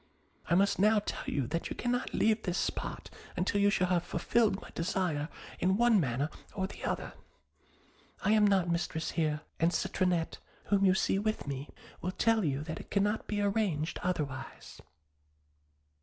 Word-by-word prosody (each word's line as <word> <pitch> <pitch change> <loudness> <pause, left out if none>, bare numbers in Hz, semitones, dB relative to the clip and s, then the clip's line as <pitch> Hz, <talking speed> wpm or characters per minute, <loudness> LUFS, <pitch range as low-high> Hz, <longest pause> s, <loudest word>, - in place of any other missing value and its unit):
I 170 - +4
must 200 +1 +3
now 215 +2 +5
tell 210 - -3
you 140 -3 0
that 165 +7 -3
you - - -4
cannot 245 0 -1
leave 220 0 +2
this 180 -3 -2
spot - - -3 0.3
until 195 +3 +1
you 205 - +5
shall 185 -2 +1
have 175 -2 +2
fulfilled 205 +3 +1
my - - -12
desire 165 -3 -1 0.3
in 190 +2 +2
one 235 -2 +5
manner 140 0 0 0.2
or 190 - 0
the 190 - -9
other. - - -2 1.1
I - - +3
am 215 -1 +5
not 190 -3 +3
mistress 170 -2 -1
here; 155 -2 0 0.2
and 165 +1 +3
Citronette, 180 -3 0 0.3
whom 200 -1 +4
you 185 -1 +5
see 195 - +2
with 215 +1 -1
me, 140 0 -5 0.3
will 185 +2 -2
tell 225 0 +2
you 140 -2 0
that 160 +1 -5
it - - -11
cannot 205 +2 +1
be 205 -1 -1
arranged 195 -7 0
otherwise.' 150 -7 -4
185 Hz, 170 wpm, -31 LUFS, 160-205 Hz, 1.1 s, now